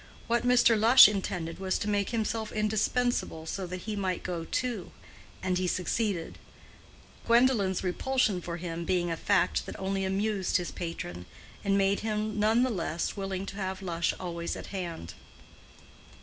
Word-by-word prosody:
What 235 +1 +1
Mr. 240 -2 +4
Lush 235 +3 +9
intended 180 -5 -3
was 190 -1 0
to - - -4
make 205 -1 0
himself 220 -1 -2
indispensable 215 -4 0
so 185 +3 -4
that 180 +1 -6
he 215 +2 -4
might 190 -3 -2
go 170 -2 -3
too, 240 -5 -3 0.5
and 185 -1 0
he 185 - 0
succeeded; 185 0 -1 0.9
Gwendolen's 230 -6 +3
repulsion 210 +1 0
for 170 0 -5
him 170 -1 -5
being 175 -1 0
a - - 0
fact 190 +2 +1
that - - -7
only 195 0 -1
amused 195 0 0
his 175 - -4
patron, 90 - -6 0.4
and 200 -1 +2
made 195 0 +2
him 215 -1 -2
none 220 +3 +4
the 255 - +1
less 170 -4 -2
willing 195 -1 -3
to 195 - -7
have 190 0 -4
Lush 170 -2 0
always 170 -2 -4
at - - -7
hand. 170 - -5
195 Hz, 160 wpm, -29 LUFS, 175-215 Hz, 0.9 s, Lush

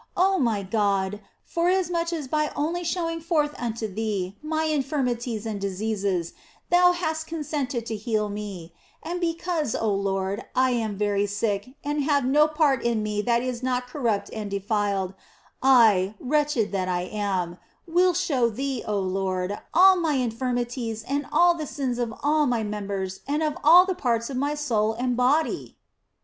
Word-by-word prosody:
Oh 380 +1 +3
my 225 -7 +1
God, 200 0 0 0.2
forasmuch 345 -1 0
as 315 -5 -3
by 305 +2 0
only 335 +4 -1
showing 330 -1 -2
forth 310 -3 +1
unto 230 -2 -3
Thee 200 -2 -3
my 315 +1 -1
infirmities 255 -7 -1
and 210 -3 -4
diseases 195 -3 -2 0.4
Thou 355 0 +6
hast 320 -2 -2
consented 285 -7 -3
to 225 - -3
heal 215 0 -1
me, 200 -5 -7 0.3
and 345 +3 -3
because, 335 -5 -1
oh 220 -2 0
Lord, 195 +1 -1
I 260 0 +3
am 220 -4 -1
very 205 0 +1
sick 205 +4 -2
and 290 0 -1
have 285 -2 +2
no 295 +4 +5
part 300 -5 +2
in 230 -2 0
me 210 -1 -1
that 235 +2 +1
is 250 -1 -3
not 250 -1 -1
corrupt 240 -6 -2
and 215 -2 -4
defiled, 200 -1 -1 0.5
I, 220 -7 +5
wretched 290 -5 +1
that 190 -2 -1
I 175 -1 0
am, 185 -3 -2 0.3
will 355 +1 +3
show 275 -9 +1
Thee, 265 +2 -3
oh 210 -1 0
Lord, 190 +1 -2
all 375 +2 +7
mine 310 -6 +1
infirmities 240 -1 -2
and 280 +3 -2
all 350 0 +5
the 315 -3 -5
sins 260 -4 -3
of 235 -2 -1
all 300 0 +3
my 240 -3 0
members 200 -2 -4
and 295 +3 0
of 305 -1 0
all 345 +4 +8
the 375 - -1
parts 235 -5 -1
of - - -4
my 285 +3 0
soul 225 -7 0
and 245 +2 -1
body 265 +6 +1
245 Hz, 165 wpm, -25 LUFS, 205-300 Hz, 0.5 s, all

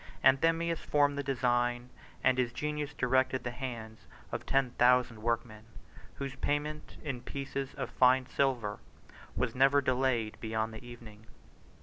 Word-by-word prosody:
Anthemius 165 +4 +3
formed 145 -1 +2
the 140 - -1
design, 120 -2 0 0.3
and 130 - +3
his 120 -2 +1
genius 150 +3 -3
directed 130 -1 +1
the 125 - -3
hands 120 -4 -7 0.2
of - - -5
ten 135 -2 +2
thousand 125 -2 +3
workmen, 115 -1 -2 0.5
whose 135 -1 -5
payment 150 +2 -2
in 135 -5 -4
pieces 135 +1 -5
of 130 -3 -4
fine 130 0 +4
silver 120 -7 0 0.6
was 125 -3 -1
never 135 +2 +5
delayed 130 -4 0
beyond 110 0 -2
the 110 - -9
evening. 115 -3 -12
130 Hz, 135 wpm, -31 LUFS, 120-140 Hz, 0.6 s, never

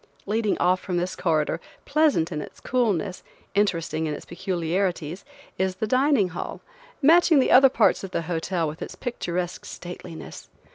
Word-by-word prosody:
Leading 215 0 0
off 180 +1 +3
from 180 -2 -3
this 180 +1 -1
corridor, 160 -3 0 0.3
pleasant 285 - +2
in 150 -2 -3
its - - -10
coolness, 205 -7 0 0.3
interesting 165 -5 0
in 150 - -2
its - - -10
peculiarities, 175 -1 -2 0.4
is 190 0 0
the 200 - -2
dining 255 -3 +3
hall, 175 - -6 0.4
matching 330 +1 +6
the 265 - +3
other 270 +1 +8
parts - - +3
of 195 - -5
the 170 - -2
hotel 165 0 -1
with 150 +2 -7
its - - -6
picturesque 180 -7 -3
stateliness. 175 -2 -9
185 Hz, 155 wpm, -25 LUFS, 170-220 Hz, 0.4 s, other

